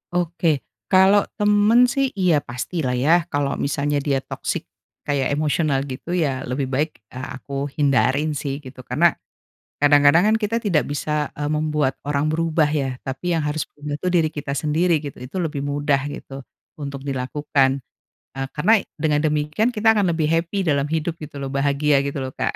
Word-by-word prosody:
Oke, 170 -1 +1 0.4
kalo 190 +2 +6 0.2
temen 210 +3 +4
sih 275 -1 +2
iya 180 -4 +4
pastilah 125 +2 -2
ya, 150 - +3 0.2
kalo 145 -1 +1 0.2
misalnya 145 0 0
dia 140 -1 +2
toxic - - -3 0.4
kayak 140 -2 0
emosional 150 -1 +1
gitu 130 - -8
ya 145 - +1 0.2
lebih 135 +2 -1
baik, 150 +4 +1 0.2
eee, 130 +1 -6
aku 140 +2 -11 0.2
hindarin 140 +1 +2
sih 140 -2 -3
gitu 130 0 -11
karena, 145 +8 +2 0.8
kadang-kadang 145 +3 +6
kan - - +4
kita 210 +2 0
tidak 170 -9 +1
bisa, 145 +1 -3 0.3
eee, 145 0 -2
membuat 150 -3 0
orang 145 0 +1
berubah 165 -1 +2 0.2
ya 135 -2 -3
tapi 130 +4 -6
yang 155 - -1
harus 150 +1 -2
punya 145 0 -6
tuh 185 - -1
diri 170 -3 +3
kita 145 -1 -4
sendiri 155 +1 +1
gitu, 140 - -7
itu 125 +7 -8
lebih 160 -6 -2
mudah 145 -1 +1
gitu 135 -1 -8 0.4
untuk 140 -1 -6
dilakukan, 135 0 0 0.5
eee, 135 0 -4
karena 210 +9 +4 0.2
dengan 150 -1 +1
demikian 150 +8 0
kita 215 +1 0
akan 180 -5 +1
lebih 155 -1 0
happy 170 +4 0
dalam 145 -3 +1
hidup 160 +2 -2
gitu 150 -1 -9
loh 135 - -4
bahagia 140 +1 +2
gitu 140 -1 -3
loh, 130 - -5
Kak. - - -2
150 Hz, 170 wpm, -22 LUFS, 140-165 Hz, 0.8 s, kalo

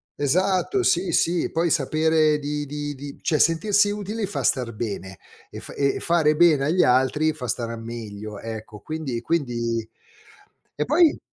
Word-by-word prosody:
esatto, 185 - +1
sì, 185 - +2
sì, 170 0 +1
poi 165 +1 +1
sapere 155 0 +2
di 145 0 -3
di 145 0 -5
di 140 +1 -9
cioè 155 - +1
sentirsi 205 +5 +3
utili 210 +1 -3
fa 205 - -4
star 125 -3 +1
bene 100 -3 -5 0.3
e - - -8
fa - - -10
e 140 -1 0
fare 160 -3 +2
bene 155 -4 +4
agli 175 +5 +3
altri 130 +5 +2
fa 125 -5 -7
stare 115 0 -3
meglio, 110 -3 -7
ecco. 110 -1 -8
Quindi 155 -5 -4
quindi 120 -7 -1 0.9
e 150 - -1
poi 315 +2 +4
150 Hz, 155 wpm, -23 LUFS, 120-170 Hz, 0.9 s, bene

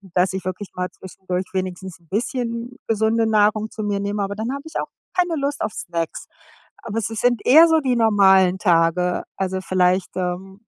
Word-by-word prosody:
dass 185 +1 +2
ich 190 -1 -4
wirklich 185 +2 -5
mal 180 0 -3
zwischendurch 185 0 -5
wenigstens 185 -1 -4
‘n 170 - -28
bisschen 235 +4 -3
gesunde 225 +1 +2
Nahrung 215 0 +2
zu 215 - -6
mir 205 -1 -1
nehme, 205 +1 -2
aber 200 +1 -3
dann 220 +4 -3
habe 280 +1 -5
ich 320 - -11
auch - - -5 0.3
keine 355 -2 +1
Lust 280 +1 -2
auf 215 - -2
Snacks. 170 -4 -4 0.6
Aber 225 -1 -4
es 225 - -1
si 225 - -5
sind 245 +1 +1
eher 320 +6 +8
so 320 -1 +4
die 260 -4 0
normalen 190 -4 +4
Tage, 175 -1 +2
also 190 0 -2
vielleicht, 185 0 +1
ähm 185 +2 -4
200 Hz, 190 wpm, -21 LUFS, 185-230 Hz, 0.6 s, eher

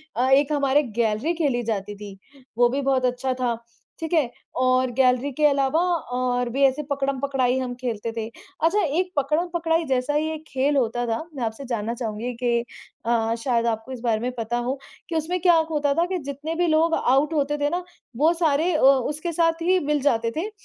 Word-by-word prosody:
अ, 255 +2 +1
एक 280 +2 +4
हमारे 285 +1 +3
गैलरी 230 +6 0
खेली 285 -7 0
जाती 205 -2 -3
थी, 200 -2 -9 0.4
वो 240 0 +5
भी 275 +3 -1
बहुत 265 -2 +1
अच्छा 250 +1 0
था, 250 -2 -1 0.4
ठीक 325 +1 -4
है। 295 -7 +3 0.3
और 255 0 +2
गैलरी 255 +2 +2
के 300 +3 +1
अलावा 275 +2 +3 0.4
और 245 -1 0
भी 275 +3 0
ऐसे 270 +3 +1
पकड़म-पकड़ाई 270 -2 0
हम 250 -1 -3
खेलते 230 -2 -3
थे। 220 0 -2
अच्छा, 330 - -1
एक 345 +5 0
पकड़म-पकड़ाई 330 +3 0
जैसा 265 +1 0
ही 305 +1 +1
एक 315 0 -8
खेल 275 +2 0
होता 240 -1 0
था, 225 +6 -1
मैं 255 - -3
आपसे 225 +4 -4
जानना 230 -2 -2
चाहूँगी 235 0 -4
कि 235 -1 +2 0.5
अ, 230 -1 +1
शायद 235 -3 +1
आपको 225 +2 -2
इस 255 - -6
बारे 225 -3 +1
में 250 +2 -2
पता 230 +1 -2
हो 265 +1 -2 0.3
कि 330 - -3
उसमें 330 +4 -1
क्या 345 -3 +5
खोता 290 -2 +1
था 335 +4 +2
कि 370 +1 -2
जितने 300 +4 -4
भी 350 +1 +1
लोग 325 +1 +3
आउट 275 +5 +2
होते 295 -1 0
थे 290 0 0
ना 355 +2 -2 0.3
वो 315 +5 +4
सारे 320 +3 +2
अ, - - +1
उसके 290 +5 +3
साथ 330 0 +1
ही 365 +2 +3
मिल 295 -1 +1
जाते 230 -5 +1
थे, 385 +6 -2
270 Hz, 200 wpm, -24 LUFS, 240-310 Hz, 0.5 s, वो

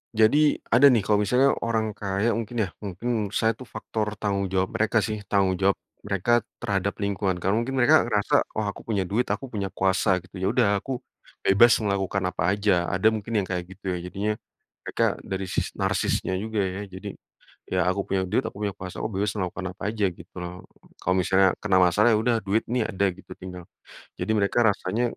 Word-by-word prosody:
Jadi, 145 +8 +4 0.2
ada 120 +5 +6
nih, 120 -5 +5
kalau 105 0 +2
misalnya 125 +6 +4 0.2
orang 110 -2 0
kaya 100 +2 -1
mungkin 115 +1 -5
ya, - - -2 0.2
mungkin 100 +3 -5 0.2
menurut 100 - -9
saya 110 - +3
tuh 130 - -10
faktor 105 -1 -3
tanggung 100 -2 0
jawab 95 0 +1
mereka 110 +1 +2
sih, 110 -1 -2
tanggung 95 -2 +2
jawab 95 0 +3 0.3
mereka 100 +3 0 0.3
terhadap 100 0 0
lingkungan. 100 -2 0
Karena 95 +3 +1
mungkin 130 +3 -3
mereka 145 +5 +6
ngerasa, 105 -3 +1 0.2
"Oh 110 - 0
aku - - -12
punya 100 -4 0
duit, 120 +5 +1
aku 135 - -2
punya 100 -3 -2
kuasa 95 -1 +1
gitu 95 - -17
ya 95 - 0
udah 120 -5 +3
aku 135 - -7 0.5
bebas 115 +5 +6
melakukan 100 -1 -1
apa 80 - -3
aja," 105 0 +1 0.2
ada 95 +4 +3
mungkin 110 +2 -5
yang - - -7
kayak 90 -1 -2
gitu - - -23
ya. 90 - -2
Jadinya 100 +4 -2 0.6
mereka - - 0 0.3
dari 95 0 -1
sisi - - -1
narsisnya - - 0
juga 110 -1 -2
ya. 95 +1 -3
Jadi 95 - -7 0.6
ya, 95 - +1
"Aku 95 +2 0
punya 95 -1 0
duit 105 +7 +1
aku - - -6
punya 100 - -2
kuasa, 95 -1 -7
oh - - -1
bebas 100 +1 0
melakukan 95 0 -3
apa - - -10
aja," 105 -3 +1
gitu 85 0 -14
loh. 90 +1 -7 0.3
Kalau 90 - +1
misalnya 95 0 +4
kena 100 -3 +2
masalah, 105 +7 +4
ya - - +4
udah 120 0 +2
duit 100 +3 0
nih 125 - +2
ada 100 +1 0
gitu 95 - -17
tinggal, 90 -1 -8 0.5
jadi - - -4
mereka 100 +3 +1
rasanya 105 0 +1
100 Hz, 200 wpm, -25 LUFS, 95-110 Hz, 0.6 s, ada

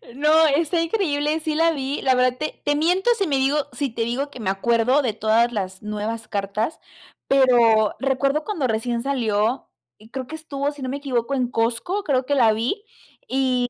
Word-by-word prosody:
No, 305 +3 +4
está 320 +3 +1
increíble, 315 -4 0
sí 310 -1 -2
la 330 +1 +3
vi. 275 -2 -3
La 260 -1 +3
verdad, 250 0 +2
te 305 +2 -5
te 290 - +2
miento 360 +8 +1
si 395 -4 0
me 280 -3 +1
digo 275 +2 +1
si 285 -2 -2
te 230 0 -5
digo 245 +5 -1
que 285 - -12
me 195 - -1
acuerdo 235 +7 +2
de 245 -6 -1
todas 225 +3 +2
las 190 -3 -4
nuevas 215 +2 -4
cartas, 205 +8 -2 0.5
pero 235 -5 +4
recuerdo 275 +2 0
cuando 325 -10 -2
recién 235 +1 -1
salió, 235 -3 0 0.3
y 215 +1 -18
creo 260 +1 -6
que 315 - -7
estuvo, 290 -3 -3
si 290 -1 -12
no 260 - -3
me 275 - -3
equivoco, 270 -3 -2
en 255 -2 0
Costco, 235 - -1
creo 265 -7 0
que 285 - 0
la 235 -5 +5
vi, 240 - -2 0.4
y 255 -2 0
265 Hz, 195 wpm, -22 LUFS, 230-295 Hz, 0.5 s, la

